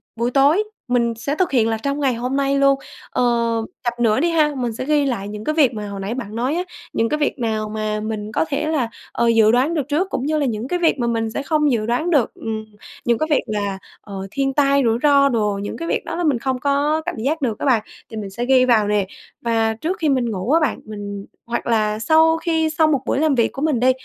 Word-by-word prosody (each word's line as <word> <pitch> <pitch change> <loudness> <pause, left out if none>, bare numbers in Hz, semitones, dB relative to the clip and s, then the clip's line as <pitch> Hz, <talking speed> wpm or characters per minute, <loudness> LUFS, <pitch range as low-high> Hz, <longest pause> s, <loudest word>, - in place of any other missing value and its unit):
buổi 235 +2 -1
tối 285 - +4 0.3
mình 235 -1 +2
sẽ 280 +6 -3
thực 365 +1 0
hiện 235 -5 +3
là 225 - 0
trong 280 +1 -1
ngày 270 -3 +2
hôm 250 +3 -3
nay 275 0 +1
luôn. 275 0 +4 0.3
Ờ, - - 0 0.6
chặp 240 0 -2
nữa 225 0 +3
đi 340 - +2
ha, 310 -3 +3
mình 240 -3 -2
sẽ 255 - -5
ghi 295 -1 +2
lại 230 -7 -2
những 210 +1 -7
cái 305 +4 -1
việc 270 -6 +4
mà 210 -1 -5
hồi 200 -1 -6
nãy 195 +4 -3
bạn 225 -4 -6
nói 255 +7 0
á, 355 - 0 0.3
những 225 0 +1
cái 300 - 0
việc 290 - -1
nào 220 -2 -1
mà 215 0 -2
mình 215 0 -4
có 320 - +1
thể 290 +2 -1
là, 290 -7 0 0.2
ờ, 235 - 0
dự 225 -2 +5
đoán 260 +8 +2
được 290 -4 -1
trước 340 +7 0
cũng 260 - -2
như 310 +1 +1
là 290 - +1
những 230 0 -2
cái 355 +5 -1
việc 325 -5 +2
mà 235 - 0
mình 225 -1 0
sẽ 280 - -3
không 300 -1 +2
dự 215 -3 0
đoán 245 +9 0
được. 285 -9 +2
Ừm, 220 -1 -5 0.4
những 235 -1 +2
cái 310 - -1
việc 295 - +2
là, 205 -2 -2 0.2
ờ, 195 -1 -7
thiên 270 -1 -1
tai, 280 0 +3
rủi 225 0 +2
ro 280 -1 +5
đồ, 210 -5 0
những 205 - -5
cái 335 - -5
việc - - -1
đó - - -4
là 350 - -2
mình 285 -7 +2
không 260 +1 -2
có 285 +3 +1
cảm 355 - -3
giác 285 +8 -1
được 230 -5 -1
á - - -3
bạn 235 -6 +3 0.3
thì 220 - -7
mình 205 -2 -5
sẽ 235 +5 -4
ghi 260 -1 +4
vào 220 -4 +3
nè. 205 -2 +1 0.3
Và 225 -1 +1
trước 330 - -3
khi 310 -3 +1
mình 245 -4 +1
ngủ 195 +5 -2
á 325 - +5
bạn 305 - 0
mình 205 -2 -7 0.2
hoặc 235 0 -3
là 215 -2 +1
sau 320 +5 +4
khi 325 -1 0
xong 310 0 +2
một 275 -4 +1
buổi 270 - 0
làm 305 -3 +2
việc 235 - +2
của 270 - -6
mình 300 -6 +1
đi 255 +2 +4
250 Hz, 265 wpm, -20 LUFS, 220-295 Hz, 0.6 s, dự